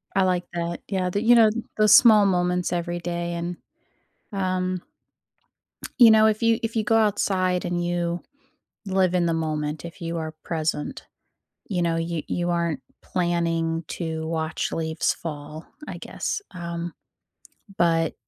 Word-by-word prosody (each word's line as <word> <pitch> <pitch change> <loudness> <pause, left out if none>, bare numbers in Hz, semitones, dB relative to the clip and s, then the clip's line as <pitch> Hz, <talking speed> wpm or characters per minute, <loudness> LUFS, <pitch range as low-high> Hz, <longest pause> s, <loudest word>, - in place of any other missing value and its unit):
I 195 - +4
like 180 -1 +1
that, 170 0 -3
yeah, 185 -2 -1
the 205 +3 -1
you 240 +1 +6
know, 225 -2 +7 0.3
those 215 -1 +7
small 215 -4 +7
moments 180 -1 +1
every 175 0 -2
day 170 0 -3
and, 170 +1 -4 0.8
um 185 -2 -1 1.2
you 235 -2 +10
know, 220 0 +6
if 220 0 +2
you 230 -1 +3
if 225 0 -2
you 220 - +1
go 225 +1 +3
outside 190 -4 +1
and 175 0 -1
you 175 0 -1 0.7
live 190 -2 +2
in 175 -1 +2
the 165 - +1
moment, 155 -1 -2
if 170 +3 -9
you 170 0 -3
are 160 -1 -4
present, 155 -2 -2 0.7
you 180 -4 0
know, 170 -1 +1
you 165 -1 -2
you 175 0 -1
aren't 170 -5 -1 0.2
planning 165 -2 -1
to 160 -2 -4
watch 160 -1 -2
leaves 160 0 0
fall, 155 0 -7 0.2
I - - -6
guess, - - -4
um. 170 -1 -5 0.8
But 165 -2 +2
175 Hz, 150 wpm, -24 LUFS, 165-185 Hz, 1.2 s, you